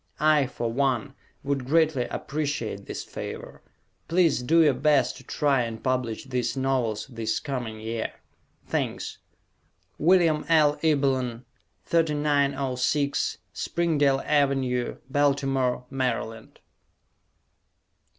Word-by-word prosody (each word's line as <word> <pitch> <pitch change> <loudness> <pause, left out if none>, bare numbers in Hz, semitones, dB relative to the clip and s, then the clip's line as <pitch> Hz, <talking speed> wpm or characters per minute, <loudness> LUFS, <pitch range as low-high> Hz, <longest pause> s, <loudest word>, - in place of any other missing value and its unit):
I, 150 -2 +4
for 120 -2 -3
one, 135 0 0 0.3
would 140 -1 -1
greatly 155 -4 +3
appreciate 140 -9 -3
this - - -5
favor. - - -8 0.5
Please 165 -6 +3
do 165 +6 +4
your 150 -3 +4
best 145 -2 +2
to 130 - -13
try 140 0 +1
and 115 -2 -5
publish 125 -3 -1
these 125 0 -2
novels 125 -5 0
this 115 -4 -2
coming 120 -6 -4
year. 110 +1 -3 0.5
Thanks. - - -3 0.8
Wm. 165 -2 +4
L. 150 -3 +4
Ebelan, 130 -6 +1 0.4
3906 140 -3 +1 0.2
Springdale 145 -5 +1
Avenue, 135 -4 +1
Baltimore, 135 -3 +1
Md. 115 -4 -3
135 Hz, 100 wpm, -26 LUFS, 125-150 Hz, 0.8 s, I